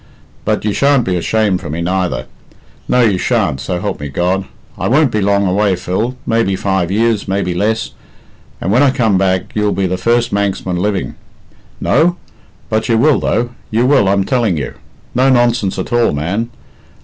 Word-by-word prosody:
But - - 0
you 105 - +1
shan't 140 -1 +3
be 95 - 0
ashamed 100 +1 0
for - - -7
me, 80 +3 -3
neither 90 -7 -1 0.6
no 125 - +3
you 105 -6 +2
shan't, 65 -5 0
so 90 +4 -3
help 100 +1 -3
me 75 -1 -5
God! 90 +6 0 0.3
I - - -2
won't 140 +1 +3
be 105 - 0
long 100 0 +2
away, 100 +1 +2
Phil 100 +8 -2
maybe 115 -4 +1
five 95 -3 -1
years, 110 +1 +1
maybe 95 -2 -1
less, 105 +4 -1 0.7
and 95 - -2
when 120 +5 +4
I 145 - +5
come 115 -7 +1
back 95 0 0
you'll 105 -1 +1
be 100 - 0
the 90 0 -1
first 120 +1 +1
Manxman 100 -3 -1
living. 100 +1 -1 0.7
No? 175 +2 +2 0.5
But 110 +1 -1
you 115 - +3
will, 145 +4 +4
though; 120 +2 0 0.2
you 115 +3 +1
will, 130 -8 +4
I'm 100 0 +2
telling 115 - 0
you. 70 - -4 0.4
No 130 +2 +3
nonsense 120 -6 +2
at - - -4
all, 120 -7 +3
man. 95 +11 -2
100 Hz, 185 wpm, -15 LUFS, 95-115 Hz, 0.7 s, I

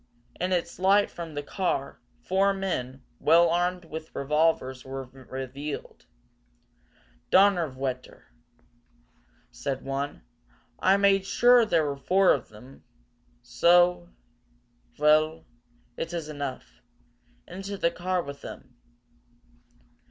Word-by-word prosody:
In 180 +1 -1
its 175 -1 -2
light 200 +2 +3
from 165 -3 -8
the 145 - -3
car, 160 -5 -2 0.2
four 195 +1 +2
men, 135 -9 -4 0.2
well 170 +2 +5
armed 175 +1 0
with 160 0 -9
revolvers, 140 -3 0
were 135 0 -6
revealed. 135 +2 -8 1.2
"Donnerwetter!" 140 -10 +1 1.3
said 130 - -4
one. 135 - -4 0.6
"I 190 +1 +4
made 195 -1 +3
sure 245 +2 +5
there 165 -6 +2
were 140 -1 -3
four 185 +7 +3
of 135 - -4
them! 125 +6 -15 0.6
So! 170 - +3 0.9
Vell, 155 +1 +2 0.5
it 165 - -4
is 165 -3 -4
enough. 145 -3 -7 0.7
Into 195 +1 -6
the 170 -2 +1
car 180 0 -2
with 140 0 -9
them!" - - -10
160 Hz, 105 wpm, -27 LUFS, 135-185 Hz, 1.3 s, well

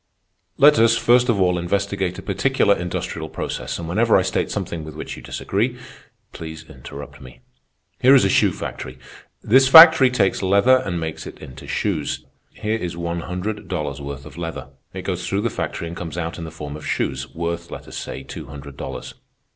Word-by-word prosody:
"Let 145 -4 +6
us, 115 0 +5
first 120 +1 +4
of 110 -4 +2
all, 90 -1 +2
investigate 95 0 -1
a - - -8
particular 100 +1 +2
industrial 90 -2 -4
process, - - -4
and 85 - -6
whenever 85 - +3
I - - +2
state - - -1
something 80 -2 -4
with 75 -1 -9
which - - -6
you - - -11
disagree, 100 - -2 0.6
please 80 0 -8
interrupt 70 +2 -10
me. 65 -1 -13 0.6
Here 130 +2 +7
is 130 - +5
a - - +2
shoe - - +4
factory. 65 0 -7 0.5
This 130 +4 +5
factory 160 -2 +10
takes 110 -6 +1
leather 100 +7 +5
and 90 -8 -3
makes 80 -1 -5
it - - -10
into 65 - -11
shoes. 80 -8 -2 0.2
Here 110 +1 -2
is 85 -3 -5
one 85 0 -3
hundred 90 +5 -5
dollars' 75 -6 -3
worth 70 0 -7
of 75 +2 -11
leather. 80 -5 -5 0.2
It - - -7
goes - - -3
through 100 +1 0
the 115 0 -1
factory 85 - -4
and 85 - -7
comes 85 -1 -6
out 85 0 -4
in 85 - -5
the - - -6
form 75 -2 -7
of 75 - -8
shoes, 65 0 -2
worth, 85 0 -3
let - - -9
us - - -10
say, 65 - -6
two - - -9
hundred 70 -1 -10
dollars. - - -6
85 Hz, 195 wpm, -21 LUFS, 75-105 Hz, 0.6 s, factory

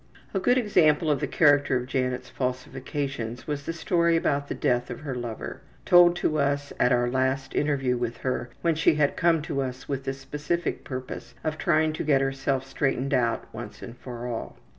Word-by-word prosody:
A 195 - +1
good 245 +7 +3
example 160 -9 +3
of 145 - +1
the - - -1
character 145 -3 +4
of 125 - -3
Janet's 125 -1 -2
falsifications 130 -1 -4
was 145 -1 -4
the - - 0
story 170 0 +2
about 145 -3 +1
the - - -3
death 125 -3 0
of 125 - -6
her 145 -3 -4
lover, 120 -3 -5 0.2
told 175 -1 +7
to 155 -3 0
us 140 0 0
at 125 - +4
our 120 -1 +3
last 130 +2 0
interview 135 -4 +1
with 120 -1 -3
her 125 -1 -1
when 170 -1 +3
she 155 0 +3
had 145 -2 +2
come 165 -3 +2
to 140 - -2
us 130 -1 -5
with 135 -1 -3
the 135 - -1
specific 150 +5 -3
purpose 130 -2 -7
of 155 0 -2
trying 155 -2 +2
to - - -3
get 145 -3 +3
herself 135 0 -1
straightened 135 0 -1
out 120 -2 +1
once - - -8
and 120 - -8
for 120 -1 -8
all. 120 -2 -5
135 Hz, 195 wpm, -26 LUFS, 125-155 Hz, 0.2 s, told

